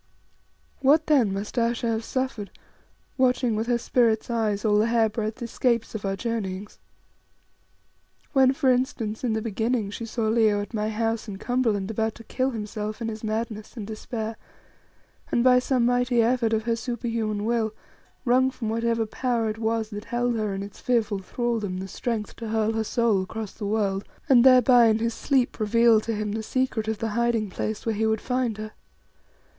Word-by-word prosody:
What 300 +4 +4
then 265 -10 +3
must 205 +5 -3
Ayesha 235 0 0
have 225 0 -1
suffered, 255 -6 -3 0.7
watching 250 -3 +2
with 220 +2 -2
her 240 -1 +2
spirit's 235 -1 +1
eyes 215 -2 0
all 210 -1 +4
the 220 - +3
hair 230 -1 +3
breadth 220 +2 -4
escapes 235 0 0
of 215 -2 -5
our 195 0 0
journeyings? 205 -2 -4 1.5
When, 265 -2 +5
for 265 -1 +2
instance, 240 -4 -1
in 240 -3 +1
the 220 0 -2
beginning 225 -1 -1
she 230 +2 -6
saw 230 +1 -3
Leo 215 -2 +3
at 205 +3 -6
my 215 -1 -1
house 225 +1 -1
in 200 -2 -6
Cumberland 220 -3 0
about 220 0 -1
to 230 - -12
kill 260 +3 -1
himself 215 -2 -5
in 230 -1 -3
his 220 0 -7
madness 220 +1 -4
and 215 - -4
despair, 220 +1 -5 0.9
and 235 - +2
by 250 0 +6
some 250 -1 +1
mighty 245 -1 +2
effort 235 -1 +2
of 220 -1 +1
her 230 0 0
superhuman 230 -3 -2
will, 230 -1 +1 0.5
wrung 255 +1 +4
from 245 -4 -5
whatever 230 0 0
Power 235 0 -1
it 215 - -8
was 225 -1 -1
that 205 +1 -6
held 240 0 0
her 215 -2 -1
in 195 - -4
its 200 - -11
fearful 225 -5 +1
thraldom, 215 -1 -2
the 190 +1 -5
strength 220 +1 -3
to 230 -2 -6
hurl 220 0 +1
her 225 0 -1
soul 225 -3 +1
across 215 +2 -5
the 205 - -6
world 200 -2 0 0.2
and 245 -3 +6
thereby 250 -2 +7
in 220 -1 +3
his 230 +1 -1
sleep 260 -2 0
reveal 225 +1 +4
to 225 0 -3
him 210 0 -2
the 220 +1 -2
secret 245 -1 -1
of 220 -1 -1
the 225 +2 -2
hiding 230 -2 0
place 215 +3 -4
where 225 - +1
he 220 +1 0
would 220 0 +1
find 250 -3 -1
her. 215 0 -6
225 Hz, 185 wpm, -25 LUFS, 215-240 Hz, 1.5 s, thereby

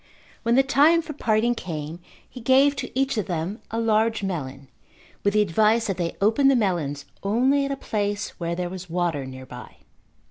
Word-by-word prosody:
When 235 0 +2
the 270 - +5
time 295 +5 +4
for 310 - -7
parting 230 -3 +1
came 160 -6 -6 0.3
he 250 - -11
gave 270 +4 +4
to 250 -2 -4
each 270 -4 +1
of 210 - -3
them 175 +4 -3
a 225 - -2
large 220 -1 +1
melon 135 -8 -4 0.6
with 200 +1 +1
the 210 - +5
advice 215 +5 +2
that 195 -3 -2
they 170 -2 -2
open 225 +7 +3
the 275 - +5
melons 165 - -1 0.2
only 260 +8 +2
at 275 - -3
a - - -1
place 205 -4 -2
where 170 0 -2
there 180 0 -2
was 180 0 -8
water 165 -5 -1
nearby. 130 -1 -10
210 Hz, 185 wpm, -24 LUFS, 170-245 Hz, 0.6 s, the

